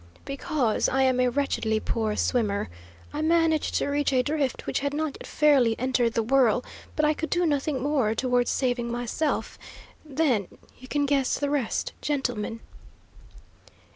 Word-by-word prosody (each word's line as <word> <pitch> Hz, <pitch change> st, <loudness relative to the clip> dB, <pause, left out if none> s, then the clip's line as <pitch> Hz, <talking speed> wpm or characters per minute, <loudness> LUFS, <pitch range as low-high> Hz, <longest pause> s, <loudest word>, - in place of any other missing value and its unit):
"Because 275 Hz, -4 st, 0 dB
I 265 Hz, 0 st, +2 dB
am 260 Hz, -1 st, +2 dB
a 250 Hz, 0 st, +3 dB
wretchedly 235 Hz, -5 st, 0 dB
poor 215 Hz, -1 st, -1 dB
swimmer. 205 Hz, -, 0 dB, 0.4 s
I 300 Hz, -, -2 dB
managed 320 Hz, -1 st, +2 dB
to -, -, +1 dB
reach 285 Hz, 0 st, +1 dB
a 255 Hz, -1 st, +3 dB
drift 285 Hz, -2 st, -1 dB
which -, -, -1 dB
had 280 Hz, +1 st, -2 dB
not 310 Hz, -2 st, -2 dB
yet -, -, -9 dB
fairly 270 Hz, -7 st, +3 dB
entered 250 Hz, -2 st, +1 dB
the 230 Hz, -, +2 dB
whirl, 250 Hz, -1 st, +3 dB, 0.3 s
but 305 Hz, -, +2 dB
I 300 Hz, -, +3 dB
could 320 Hz, +1 st, -4 dB
do 350 Hz, 0 st, +1 dB
nothing 285 Hz, -3 st, 0 dB
more 270 Hz, -7 st, +1 dB
towards 245 Hz, 0 st, +1 dB
saving 245 Hz, -2 st, 0 dB
myself. 245 Hz, +6 st, -2 dB, 0.4 s
Then 275 Hz, -, 0 dB, 0.3 s
you 255 Hz, -, -12 dB
can 290 Hz, +2 st, 0 dB
guess 275 Hz, -2 st, +1 dB
the 285 Hz, 0 st, -1 dB
rest, 275 Hz, -6 st, -1 dB
gentlemen." 245 Hz, -6 st, -2 dB
265 Hz, 160 wpm, -26 LUFS, 240-290 Hz, 0.4 s, a